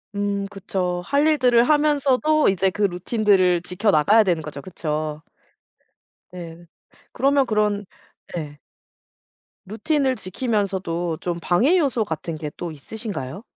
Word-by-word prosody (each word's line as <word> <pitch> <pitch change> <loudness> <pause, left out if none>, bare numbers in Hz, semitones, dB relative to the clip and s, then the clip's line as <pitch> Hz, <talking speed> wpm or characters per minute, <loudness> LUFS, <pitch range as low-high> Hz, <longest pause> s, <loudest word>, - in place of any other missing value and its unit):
음 200 0 -1
그쵸. 185 -3 -3
할 285 +6 +1
일들을 250 -6 +4
하면서도 300 0 +3
이제 190 0 +2
그 210 +3 -3
루틴들을 185 -1 +2
지켜나가야 200 +2 +3
되는 170 -5 0
거죠 145 -2 -7
그쵸? 155 -2 -4 1.1
네. 170 -1 -9 0.5
그러면 275 0 +2
그런 210 -2 0 0.5
네. 150 -4 -6 1.1
루틴을 260 +6 0
지키면서도 185 -6 -2
좀 175 -1 -3
방해 250 - +3
요소 270 -8 +1
같은 160 -1 -5
게 150 -2 -5
또 175 -2 -5
있으신가요? 190 - -7
195 Hz, 255 characters per minute, -22 LUFS, 170-240 Hz, 1.1 s, 일들을